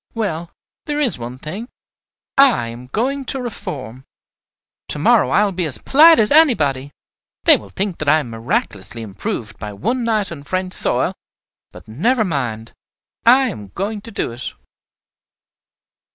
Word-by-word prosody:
Well, 170 -7 -3 0.4
there 295 0 -2
is 245 - +2
one 120 +2 -6
thing, 195 - -7 0.7
I 255 - +4
am 120 +2 -9
going 265 - -1
to 265 - -3
reform. 145 - -6 0.8
To - - -4
morrow - - +4
I 205 +9 +3
will 200 - -1
be 180 -3 -2
as 135 - +3
polite 320 +4 +6
as 210 -1 +3
anybody. 150 - +3 0.5
They - - +8
will 100 - -7
think 190 - -3
that 155 - 0
I 155 - +6
am 125 -7 -4
miraculously 115 -2 -3
improved 105 +1 -5
by 105 -1 -6
one 240 - -2
night 215 -4 0
on 155 -4 -7
French 185 +5 -3
soil; - - 0 0.6
but, - - -14
never 220 - +1
mind! 120 - -3 0.5
I 260 +2 +6
am 105 - -8
going 205 +2 -3
to 230 - -10
do 200 - -3
it." 120 +1 -6
170 Hz, 155 wpm, -19 LUFS, -, 0.8 s, They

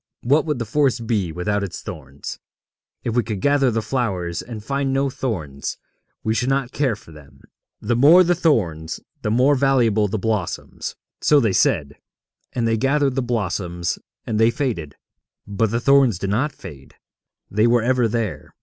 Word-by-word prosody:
What 145 +6 +3
would 150 -3 0
the 120 - -3
forest 125 -1 +1
be 105 -7 0
without 100 +5 -1
its 100 - -5
thorns? 70 -2 -8 0.6
If 115 - -2
we 120 - +4
could 105 -3 -4
gather 140 +2 +3
the 115 -1 -1
flowers 95 -8 -2
and 115 -3 -8
find 135 +3 -1
no 135 0 +1
thorns, 80 - -4 0.5
we 110 - +1
should 125 +3 0
not 135 -2 0
care 135 -6 0
for 105 -6 -16
them. 75 -2 -16 0.4
The 120 +3 0
more 155 +9 +7
the 175 0 +3
thorns, 90 - 0 0.2
the - - -1
more 125 +6 +4
valuable 125 -6 +3
the 105 +3 -2
blossoms.' 105 -4 -3 0.3
So 150 - +5
they 110 -7 +1
said, 75 -4 +1 0.5
and 120 -2 -1
they 115 0 +2
gathered 135 +2 +2
the 135 - 0
blossoms, 95 -7 -2 0.3
and 110 -2 -1
they 115 +1 +5
faded. 110 - -3 0.5
But 100 +2 0
the 115 +2 0
thorns 135 -5 +4
did 95 +1 -3
not 130 +9 +1
fade; 70 - -12 0.6
they 105 +3 +3
were 120 -1 +3
ever 125 -1 +2
there. 110 -3 -3
115 Hz, 175 wpm, -22 LUFS, 100-135 Hz, 0.6 s, more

